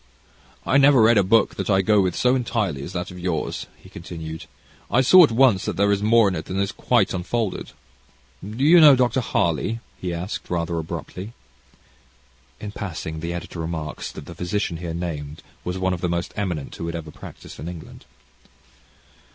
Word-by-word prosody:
"I 135 - +3
never 140 -1 +6
read 110 0 +6
a - - +4
book 105 +3 +3
that - - -3
I 95 -1 +3
go 105 +1 +4
with, 90 -3 0
so 125 0 +3
entirely, 110 - -1
as 85 - -7
that 90 0 -4
of 90 - -10
yours," 85 -4 -3
he - - -17
continued. 80 -1 -8 0.4
"I 130 - +3
saw 180 +8 +8
at 150 - +4
once 115 -5 +4
there 100 +1 +1
is 100 0 +1
more 110 0 +5
in 95 - -1
it 80 - -5
than 95 +1 -3
is 100 0 0
quite - - +1
unfolded. 95 +3 -2 0.7
Do 110 +7 -4
you 165 +3 +7
know 145 -3 +9
Dr. 125 0 +1
Harley?" 105 - 0 0.2
he 90 - -3
asked, 85 +3 -5
rather 85 -1 -1
abruptly. 95 +6 -7 1.3
In 105 - -6
passing, 80 -6 -5
the 85 +2 -4
editor 85 0 -6
remarks 80 -2 -5
that - - -9
the - - -9
physician 90 -1 -2
here 85 -1 -5
named 80 -4 -5 0.2
was 90 +1 -3
one 95 0 0
of 85 - -5
the 90 - 0
most 85 0 -2
eminent 90 -8 -3
who 85 - -5
had 85 - -4
ever 80 -2 -6
practised - - -12
in 80 +5 -5
England. 85 -7 -11
95 Hz, 190 wpm, -23 LUFS, 85-110 Hz, 1.3 s, know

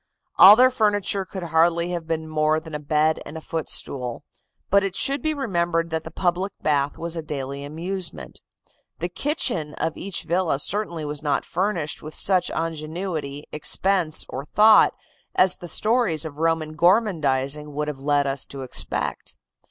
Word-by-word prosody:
All 195 +3 +11
their 255 +2 +5
furniture 205 -4 +1
could 190 -1 -7
hardly 170 +1 +2
have 170 -2 -4
been 160 -1 -2
more 155 0 +1
than 160 0 -12
a 150 - -3
bed 155 +1 +1
and 150 +2 -9
a - - -5
footstool; 140 -6 -2 0.5
but 200 +1 +5
it 195 -1 -3
should 275 +4 +1
be 310 - 0
remembered 170 - -1
that 160 0 -2
the - - -8
public 180 +3 -1
bath 145 -1 0
was 170 0 -4
a 165 - -3
daily 140 -2 -5
amusement. 170 +5 -5 0.6
The 175 - -3
kitchen 180 - -2
of 165 - -2
each 195 -1 -3
villa 175 -4 0
certainly 170 0 -1
was 150 0 -4
not 145 -2 0
furnished 175 -4 -2
with 155 0 -9
such 185 -2 +2
ingenuity, 155 -2 -4
expense 175 +1 +1
or 135 +2 -6
thought 215 +6 +5 0.4
as 185 0 +3
the 175 - -9
stories 215 - +1
of 150 -1 -8
Roman 160 -1 0
gormandising 150 - +1
would 150 +1 -3
have 145 -3 -5
led 145 0 +1
us 135 -1 0
to 135 -1 -8
expect. 130 - -3
165 Hz, 165 wpm, -23 LUFS, 150-190 Hz, 0.6 s, All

